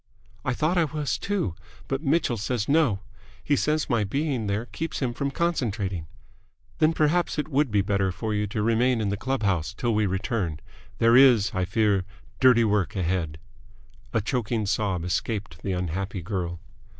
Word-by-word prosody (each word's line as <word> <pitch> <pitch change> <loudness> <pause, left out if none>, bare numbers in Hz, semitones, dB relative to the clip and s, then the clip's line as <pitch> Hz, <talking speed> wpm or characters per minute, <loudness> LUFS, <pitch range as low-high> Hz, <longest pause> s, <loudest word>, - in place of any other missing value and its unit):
"I 125 - -1
thought 165 +6 +1
I 165 - +4
was, 150 -1 -2
too. 200 - -1 0.3
But 135 +1 -2
Mitchell 150 -4 +1
says 110 0 -2
no. 140 -10 +3 0.4
He 145 - +2
says 150 +2 +1
my 115 -3 +1
being 130 +1 -1
there 100 +3 -1
keeps 165 +6 -5
him 125 -3 -1
from 140 +3 -2
concentrating." 110 - -1 0.7
"Then 155 0 +5
perhaps 160 +2 +1
it 150 - -2
would 145 -1 +2
be 105 -2 +2
better 100 -1 +1
for 110 +4 -3
you 105 0 0
to 105 +1 -2
remain 115 +2 +2
in 105 -2 0
the 100 - 0
club 130 +3 -2
house 85 -6 0
till 120 -2 0
we 105 -1 +2
return. 95 -4 -2 0.4
There 115 +1 +5
is, 125 -6 +6
I 95 -1 0
fear, 100 -1 +2 0.4
dirty 125 -3 +6
work 105 -1 +1
ahead." 85 -4 -1 0.7
A 115 - +1
choking 110 0 -1
sob 95 -3 0
escaped 90 -2 -3
the 95 - -2
unhappy 90 +1 -3
girl. 85 -3 -3
110 Hz, 175 wpm, -26 LUFS, 95-135 Hz, 0.7 s, is